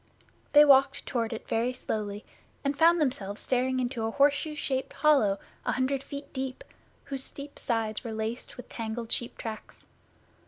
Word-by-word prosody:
They 295 0 +9
walked 270 -1 +5
toward 230 -3 -1
it 225 - -6
very 235 +3 +1
slowly 210 -3 -4 0.4
and 280 0 0
found 335 +3 +5
themselves 220 -9 -1
staring 255 0 +1
into 245 -2 -2
a 225 - 0
horseshoe 285 +4 +2
shaped 265 -3 -2
hollow 270 -11 +4 0.3
a - - 0
hundred 265 +1 0
feet 280 0 -8
deep, 260 -1 -4 0.4
whose 270 -1 0
steep 285 +1 -8
sides 225 -3 -1
were 230 - -5
laced 220 +2 -4
with 250 - -9
tangled 225 0 -5
sheep 240 - -2
tracks. 220 -1 -7
255 Hz, 160 wpm, -29 LUFS, 225-280 Hz, 0.4 s, They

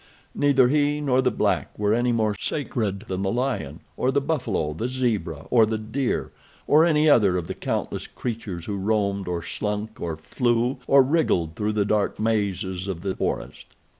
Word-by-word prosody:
Neither 135 -3 +4
he 145 +2 +2
nor 130 -3 +2
the 130 - +2
black - - -1
were 105 0 +1
any 120 +2 +2
more 110 -2 +1
sacred 105 -5 -2
than 95 0 -3
the 95 0 0
lion, 120 - -2
or 130 - 0
the 140 - +2
buffalo, 125 - -1
the 115 +11 -3
zebra 110 - -2
or 115 -3 +5
the 110 0 -1
deer, 120 +5 -2 0.3
or 155 +2 +5
any 155 -2 +3
other 100 -10 +5
of 90 - -3
the - - -4
countless - - -3
creatures 105 -8 -5
who 100 -2 -3
roamed, 100 -1 0
or 85 -1 -2
slunk, 105 +4 -4
or 85 -2 -3
flew, 120 - 0
or 135 -1 +7
wriggled 130 - +1
through 105 +3 -1
the 105 -1 +1
dark 105 -1 0
mazes 100 -4 -1
of 90 -4 -4
the 95 0 -2
forest. - - -4
110 Hz, 180 wpm, -24 LUFS, 95-130 Hz, 0.3 s, or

